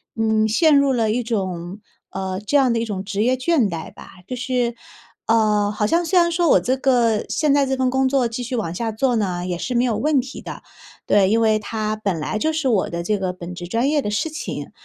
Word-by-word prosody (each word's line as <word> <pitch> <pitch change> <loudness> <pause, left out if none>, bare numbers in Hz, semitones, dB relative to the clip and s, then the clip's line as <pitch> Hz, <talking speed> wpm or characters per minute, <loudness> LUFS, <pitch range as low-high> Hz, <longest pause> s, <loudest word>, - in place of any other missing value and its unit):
嗯， 220 -1 +2
陷 300 +8 +4
入 280 -1 +3
了 225 -4 +1
一 245 +3 0
种 190 -5 -4 0.3
呃， 190 -1 -4
这 210 +8 +1
样 260 -4 +3
的 230 - 0
一 - - -1
种 200 -4 -4
职 200 +1 -3
业 250 +2 +2
倦 260 -4 +1
怠 165 -2 -6
吧。 - - -13 0.2
就 255 - -4
是， 250 -1 -1 0.5
呃， 210 -2 +2
好 210 0 -1
像 335 +10 +2
虽 360 +2 +3
然 340 0 +3
说 340 -1 +1
我 - - +6
这 255 - 0
个 240 -5 +2
现 300 -3 +1
在 280 -1 +3
这 265 0 -1
份 260 0 +1
工 265 0 +2
作 260 -3 +2
继 230 +2 -5
续 250 +1 -4
往 205 -8 -2
下 225 +4 -2
做 245 +3 0
呢， 180 -5 -1
也 180 -1 -2
是 250 - -3
没 240 - +3
有 235 -3 0
问 300 -1 +2
题 255 +1 -6
的。 - - -9 0.4
对， 195 -2 +3
因 225 +2 +2
为 220 -1 +3
它 215 0 -3
本 200 -6 -2
来 155 +7 -3
就 315 - +1
是 310 -3 -1
我 215 -7 +1
的 170 0 -4
这 210 +3 -1
个 185 -1 -1
本 180 0 -8
职 175 0 -7
专 230 +8 0
业 300 -1 +2
的 210 - -3
事 210 +10 -1
情。 310 - -6
225 Hz, 265 characters per minute, -21 LUFS, 205-265 Hz, 0.5 s, 我